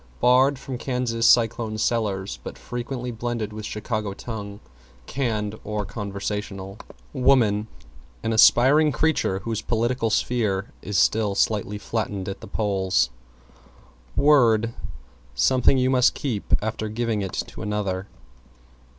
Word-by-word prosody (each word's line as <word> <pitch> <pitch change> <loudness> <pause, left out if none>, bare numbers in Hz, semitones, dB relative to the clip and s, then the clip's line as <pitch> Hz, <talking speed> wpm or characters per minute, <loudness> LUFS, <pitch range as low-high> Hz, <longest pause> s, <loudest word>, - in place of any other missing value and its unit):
Barred 130 +3 +4
from 130 -1 -6
Kansas 125 -3 0
Cyclone 115 -2 +3
cellars 105 -4 -1
but - - -7
frequently 125 0 -5
blended 115 -2 -3
with 110 0 -6
Chicago 105 -2 -3
tongue 100 -3 -7 0.5
canned 110 - -2
or 105 0 -3
conversational. 100 -1 -5 0.3
=WOMAN= 115 -5 +3 0.6
An 115 - 0
aspiring 135 +7 +6
creature 145 -12 0
whose 115 -2 -3
political 120 0 0
sphere 105 -4 0
is 100 -2 -2
still 105 -3 +2
slightly 105 0 0
flattened 105 -3 -3
at 100 0 -5
the 110 - -9
polls. 95 - 0 1.0
=WORD= 115 -6 +4 0.6
Something 125 - +4
you 130 0 +2
must 125 -2 +4
keep 120 -8 -4
after 110 0 -3
giving 110 -1 -1
it 95 -2 -4
to - - -5
another. 100 -2 -2
110 Hz, 120 wpm, -24 LUFS, 105-120 Hz, 1.0 s, aspiring